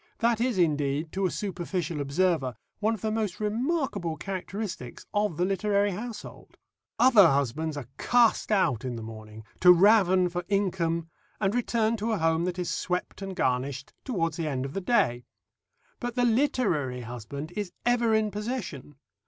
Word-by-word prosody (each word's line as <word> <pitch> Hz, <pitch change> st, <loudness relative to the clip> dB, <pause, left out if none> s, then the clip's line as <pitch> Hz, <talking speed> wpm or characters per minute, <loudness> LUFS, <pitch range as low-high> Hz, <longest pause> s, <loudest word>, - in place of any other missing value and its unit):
That 230 Hz, -1 st, +1 dB
is, 245 Hz, -4 st, +1 dB
indeed, 150 Hz, -2 st, +1 dB
to 190 Hz, 0 st, 0 dB
a -, -, -2 dB
superficial 175 Hz, -5 st, -3 dB
observer, 140 Hz, -3 st, +1 dB, 0.2 s
one 220 Hz, +2 st, +1 dB
of 205 Hz, -, -12 dB
the 220 Hz, -, -1 dB
most 215 Hz, -4 st, -2 dB
remarkable 215 Hz, -, -1 dB
characteristics 185 Hz, -, -5 dB
of 205 Hz, -6 st, 0 dB
the 180 Hz, -, +2 dB
literary 200 Hz, +1 st, +1 dB
household. 215 Hz, +2 st, -8 dB, 0.4 s
Other 235 Hz, -7 st, +7 dB
husbands 145 Hz, +2 st, 0 dB
are 145 Hz, -, -5 dB
cast 240 Hz, -2 st, +3 dB
out 135 Hz, -, +2 dB
in 125 Hz, -2 st, -3 dB
the 115 Hz, -, -6 dB
morning 110 Hz, 0 st, -10 dB, 0.2 s
to 180 Hz, -, +8 dB
raven 190 Hz, -1 st, +5 dB
for 175 Hz, 0 st, -3 dB
income 170 Hz, -5 st, 0 dB, 0.3 s
and 195 Hz, -1 st, +1 dB
return 230 Hz, -2 st, +1 dB
to 220 Hz, +2 st, -1 dB
a -, -, +1 dB
home 165 Hz, 0 st, +1 dB
that 180 Hz, 0 st, -2 dB
is 180 Hz, -1 st, -2 dB
swept 180 Hz, +2 st, -3 dB
and 195 Hz, -1 st, -5 dB
garnished 130 Hz, 0 st, -1 dB
towards 165 Hz, -, -1 dB
the 165 Hz, -2 st, -2 dB
end 135 Hz, -3 st, -2 dB
of 135 Hz, -, -6 dB
the 195 Hz, -, -2 dB
day; 125 Hz, -, +2 dB, 0.8 s
but 245 Hz, -1 st, -4 dB
the 245 Hz, -1 st, +2 dB
literary 220 Hz, -, +1 dB
husband 125 Hz, +7 st, -7 dB
is 205 Hz, -4 st, -3 dB
ever 240 Hz, -2 st, +3 dB
in 215 Hz, -1 st, +1 dB
possession. 205 Hz, -, -5 dB
185 Hz, 165 wpm, -27 LUFS, 150-215 Hz, 0.8 s, to